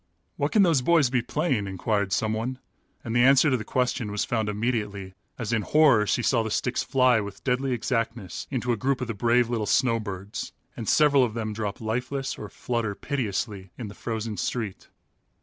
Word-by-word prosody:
"What -, -, -1 dB
can 210 Hz, -3 st, +5 dB
those 165 Hz, -8 st, +3 dB
boys 150 Hz, -3 st, +3 dB
be 125 Hz, -2 st, +2 dB
playing?" 130 Hz, -, -1 dB
inquired 95 Hz, +1 st, -1 dB
someone, 110 Hz, +5 st, -1 dB, 0.5 s
and 115 Hz, -1 st, -4 dB
the 120 Hz, -, +5 dB
answer 135 Hz, +2 st, +6 dB
to -, -, +3 dB
the 110 Hz, -, -5 dB
question 125 Hz, -1 st, -1 dB
was 105 Hz, 0 st, -1 dB
found 110 Hz, -3 st, -1 dB
immediately 105 Hz, -3 st, -2 dB, 0.2 s
as 115 Hz, -1 st, -3 dB
in 110 Hz, -, +2 dB
horror 130 Hz, -3 st, +4 dB
she 120 Hz, -, +1 dB
saw 115 Hz, -1 st, +3 dB
the 110 Hz, -, -3 dB
sticks 125 Hz, +3 st, 0 dB
fly 130 Hz, -3 st, +3 dB
with 100 Hz, -2 st, -7 dB
deadly 130 Hz, +1 st, 0 dB
exactness 115 Hz, -5 st, -2 dB
into 125 Hz, -2 st, -1 dB
a 115 Hz, -, 0 dB
group 130 Hz, +4 st, 0 dB
of 125 Hz, -, -2 dB
the 115 Hz, -, -2 dB
brave 120 Hz, +3 st, +2 dB
little 115 Hz, -3 st, -2 dB
snowbirds, 105 Hz, -5 st, -1 dB, 0.2 s
and 115 Hz, -, -4 dB
several 145 Hz, -3 st, +5 dB
of 115 Hz, -3 st, -1 dB
them 110 Hz, -2 st, -3 dB
drop 105 Hz, -1 st, -4 dB
lifeless 125 Hz, +5 st, -2 dB
or 105 Hz, -, -7 dB
flutter 115 Hz, -4 st, -2 dB
piteously 105 Hz, -7 st, -3 dB
in 115 Hz, -4 st, -6 dB
the -, -, -9 dB
frozen 110 Hz, -1 st, -4 dB
street. 110 Hz, -6 st, -3 dB
115 Hz, 190 wpm, -26 LUFS, 105-125 Hz, 0.5 s, answer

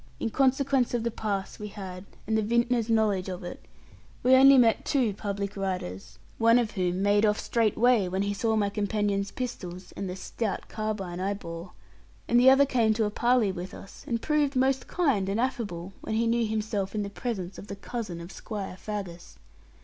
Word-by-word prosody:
In 225 Hz, -, -2 dB
consequence 270 Hz, -1 st, +2 dB
of 235 Hz, -, -1 dB
the 235 Hz, -, -1 dB
pass 205 Hz, -3 st, -3 dB
we 210 Hz, -, -5 dB
had, 190 Hz, -2 st, -8 dB, 0.2 s
and 220 Hz, -, 0 dB
the 220 Hz, -, +3 dB
vintner's 235 Hz, +1 st, +1 dB
knowledge 210 Hz, -4 st, +2 dB
of 180 Hz, 0 st, -6 dB
it, 175 Hz, -, -8 dB, 0.6 s
we 255 Hz, +1 st, +5 dB
only 270 Hz, +1 st, +8 dB
met 230 Hz, -3 st, +4 dB
two 250 Hz, -7 st, +1 dB
public 200 Hz, 0 st, -4 dB
riders, 120 Hz, -, -4 dB, 0.2 s
one 230 Hz, +1 st, +6 dB
of 235 Hz, -3 st, +1 dB
whom 185 Hz, -1 st, -1 dB
made 205 Hz, +1 st, +3 dB
off 210 Hz, -1 st, +3 dB
straightway 230 Hz, -1 st, +2 dB
when 190 Hz, +2 st, -1 dB
he 200 Hz, 0 st, -1 dB
saw 220 Hz, +2 st, 0 dB
my 205 Hz, -2 st, +1 dB
companion's 205 Hz, -1 st, 0 dB
pistols 185 Hz, -8 st, -6 dB
and 195 Hz, -, -4 dB
the 180 Hz, -, -4 dB
stout 205 Hz, +2 st, -4 dB
carbine 210 Hz, -5 st, -4 dB
I 195 Hz, +2 st, -1 dB
bore; 170 Hz, -2 st, -8 dB, 0.5 s
and 240 Hz, -, +4 dB
the 255 Hz, +2 st, +8 dB
other 270 Hz, +1 st, +6 dB
came 230 Hz, -5 st, +2 dB
to 220 Hz, 0 st, +1 dB
a 210 Hz, -, -1 dB
parley 240 Hz, -2 st, +2 dB
with 180 Hz, 0 st, -7 dB
us, 195 Hz, -, -12 dB
and 230 Hz, -1 st, 0 dB
proved 295 Hz, 0 st, +1 dB
most 265 Hz, +1 st, +1 dB
kind 265 Hz, -, +1 dB
and 200 Hz, +3 st, 0 dB
affable, 205 Hz, -8 st, -3 dB
when 220 Hz, -, -3 dB
he 230 Hz, +1 st, +2 dB
knew 230 Hz, 0 st, +2 dB
himself 215 Hz, -2 st, -2 dB
in 210 Hz, -, 0 dB
the 200 Hz, -, -4 dB
presence 195 Hz, -5 st, -4 dB
of 200 Hz, -, -10 dB
the 200 Hz, -, -6 dB
cousin 200 Hz, -4 st, -5 dB
of 170 Hz, +2 st, -9 dB
Squire 200 Hz, -4 st, -6 dB
Faggus. 195 Hz, -5 st, -6 dB
210 Hz, 195 wpm, -27 LUFS, 195-235 Hz, 0.6 s, only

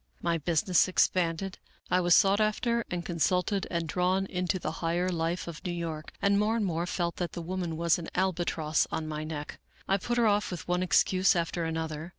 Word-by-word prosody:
My 170 Hz, -1 st, 0 dB
business 170 Hz, +3 st, +2 dB
expanded. 185 Hz, 0 st, +1 dB, 0.3 s
I 180 Hz, -, +4 dB
was 175 Hz, -1 st, +5 dB
sought 200 Hz, +1 st, +4 dB
after 235 Hz, +2 st, +1 dB
and 175 Hz, -1 st, -3 dB
consulted 180 Hz, +3 st, 0 dB
and 170 Hz, -2 st, -2 dB
drawn 180 Hz, +4 st, +1 dB
into 180 Hz, 0 st, -1 dB
the 155 Hz, -, -3 dB
higher 175 Hz, +2 st, 0 dB
life 170 Hz, 0 st, -2 dB
of 165 Hz, -2 st, -8 dB
New 180 Hz, -, -2 dB
York, 165 Hz, -2 st, -5 dB
and 200 Hz, 0 st, +4 dB
more 215 Hz, +2 st, +2 dB
and 225 Hz, -3 st, 0 dB
more 170 Hz, -1 st, -1 dB
felt 170 Hz, -1 st, -2 dB
that 175 Hz, -2 st, -3 dB
the -, -, -5 dB
woman 175 Hz, -2 st, -3 dB
was 170 Hz, +1 st, +2 dB
an 165 Hz, -, -6 dB
albatross 170 Hz, -4 st, 0 dB
on 160 Hz, -1 st, -3 dB
my 155 Hz, 0 st, -4 dB
neck. 155 Hz, -1 st, -6 dB, 0.3 s
I 195 Hz, -, +3 dB
put 240 Hz, +5 st, -2 dB
her 235 Hz, -, +4 dB
off 210 Hz, -1 st, +2 dB
with 180 Hz, -3 st, -6 dB
one 180 Hz, 0 st, +1 dB
excuse 185 Hz, +1 st, +3 dB
after 170 Hz, 0 st, -1 dB
another. 160 Hz, 0 st, -3 dB
175 Hz, 200 wpm, -29 LUFS, 165-190 Hz, 0.3 s, was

